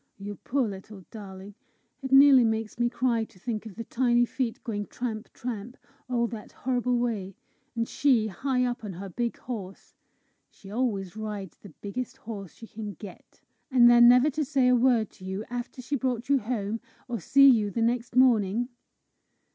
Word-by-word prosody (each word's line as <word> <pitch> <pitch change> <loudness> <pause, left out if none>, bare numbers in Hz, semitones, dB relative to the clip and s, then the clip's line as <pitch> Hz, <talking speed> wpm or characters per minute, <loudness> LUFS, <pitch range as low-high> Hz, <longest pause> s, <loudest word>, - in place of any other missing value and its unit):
You 205 0 -7
poor 260 -2 0
little 195 -1 -9
darling! 195 -2 -10 0.5
It 265 -1 -5
nearly 270 -2 +8
makes 220 0 -1
me 240 0 +2
cry 240 -2 0
to 195 - -22
think 220 +2 -4
of 200 - -11
the 230 - -5
tiny 240 +1 +2
feet 240 -1 -3
going 205 -3 -4
tramp, 230 -2 -5
tramp, 240 0 -6 0.3
all 240 -2 +1
that 220 -3 -8
horrible 250 -1 0
way, 210 -6 -2 0.4
and 230 0 -1
she 255 -7 +2
high 250 +6 -1
up 245 -1 -3
on 205 -3 -5
her 195 +3 -7
big 235 +5 -3
horse! 200 -6 -8 0.6
She 195 - -14
always 210 -5 -2
rides 210 -4 -6
the 200 - -12
biggest 250 +5 -5
horse 205 -7 -8
she 225 - -11
can 210 -2 -7
get! 200 -4 -13 0.3
And 250 -3 +6
then 240 0 +8
never 250 +5 +6
to 305 +3 -1
say 270 -3 +2
a 250 - +5
word 240 -3 +2
to - - -17
you 190 +3 -4
after 245 +1 -5
she 285 +4 -2
brought 250 -2 -2
you 280 -1 +4
home, 220 -2 -3 0.3
or 240 -3 -3
see 275 +9 +6
you 220 -6 +5
the 225 +3 -1
next 235 +1 -1
morning!" 240 -2 +3
235 Hz, 180 wpm, -27 LUFS, 205-250 Hz, 0.6 s, nearly